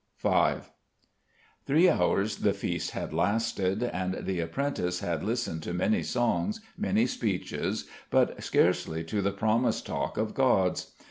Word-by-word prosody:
V - - +3 1.1
Three 160 +6 +5
hours 100 - +2
the - - +2
feast - - -2
had - - -5
lasted: 100 0 0
and 95 -5 -2
the 95 -2 -1
apprentice 90 -1 -2
had 85 -3 -2
listened 115 -7 -2
to 85 - -4
many 105 +4 +2
songs, 125 - 0 0.2
many 215 +2 +2
speeches, 100 -6 -2 0.2
but - - +2
scarcely 80 +1 +1
to 100 +6 -2
the 100 0 +1
promised 110 +4 +1
talk - - -3
of 110 0 -1
gods. 95 -9 +2
105 Hz, 135 wpm, -29 LUFS, 90-120 Hz, 1.1 s, Three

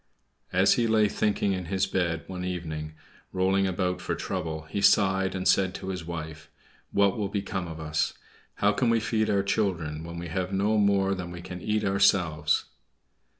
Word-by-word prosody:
As 95 +2 +4
he 120 -1 +1
lay 110 -1 +4
thinking 100 -1 0
in 90 -1 -3
his 95 +2 0
bed 85 -4 -1
one 90 -1 -6
evening, 80 -4 -4 0.4
rolling 95 +1 +2
about 90 -1 -1
for - - -2
trouble, 80 -4 -4
he 80 +6 -4
sighed, 95 -2 +3
and 95 0 -1
said 95 -1 +3
to 95 - -6
his 90 -2 -4
wife, 80 -2 -7 0.4
"What 100 +1 +2
will 100 -2 -1
become 100 -2 -3
of 80 -1 -7
us? 75 0 -1 0.4
How 105 - +3
can 120 +3 +1
we 115 0 +3
feed 110 -1 0
our 100 -1 +2
children, 85 -7 -1
when 85 0 -7
we 85 0 -5
have 90 +3 -2
no 105 +3 +2
more 100 -1 +3
than 90 -2 -5
we 85 0 -8
can 90 -1 -7
eat 105 +2 0
ourselves?" 90 -6 +2
95 Hz, 185 wpm, -27 LUFS, 85-100 Hz, 0.4 s, As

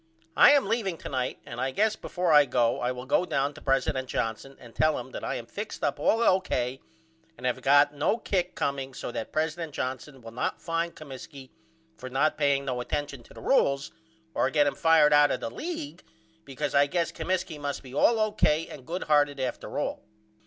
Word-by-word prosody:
I - - +8
am 285 -5 +4
leaveing 200 -5 -1
to - - -6
night 130 -2 -2
and 120 +1 -6
I 130 - 0
guess 210 +10 +1
before 180 -2 -2
I 145 -1 +8
go 120 -2 +1
I 125 - 0
will 125 0 -7
go 135 - +2
down 140 -4 -1
to 155 - -13
president 135 -1 0
Johnson 115 +5 -3
and 120 -2 -14
tell 155 0 +2
him 125 +1 -7
that - - -7
I - - -2
am 120 - -5
fixed 205 - -7
up 145 0 0
all 225 +10 +2
O.K. 135 - +1 0.6
and 125 - -8
have 125 - +1
not - - -15
got 145 +1 +5
no 145 +9 +1
kick 180 -5 -2
comeing 135 -2 -3
so 125 - -5
that 110 - -5
president 160 0 -2
Johnson 130 0 -5
will 115 - -9
not 120 - -2
fine 170 0 -2
Comiskey 135 -2 -11 0.5
for 130 - -8
not 140 +4 +1
paying 140 -2 +1
no 125 -2 -2
attention 145 0 -4
to - - -18
the - - -10
rules 140 - +2 0.4
or - - +1
get 150 -2 +3
him 145 - +1
fired 160 -2 +4
out 145 0 +6
of - - -1
the 115 - -5
league 170 - -6 0.4
because 135 - -4
I 140 0 +5
guess 170 +2 -1
Comiskey 185 -4 -3
must 145 -1 -4
be 130 -1 -12
all 225 +10 +3
O.K. 165 -7 +1
and 125 - -11
good 175 +3 -3
hearted 145 -2 +2
after 130 -1 -4
all. - - -2
145 Hz, 210 wpm, -27 LUFS, 130-165 Hz, 0.6 s, I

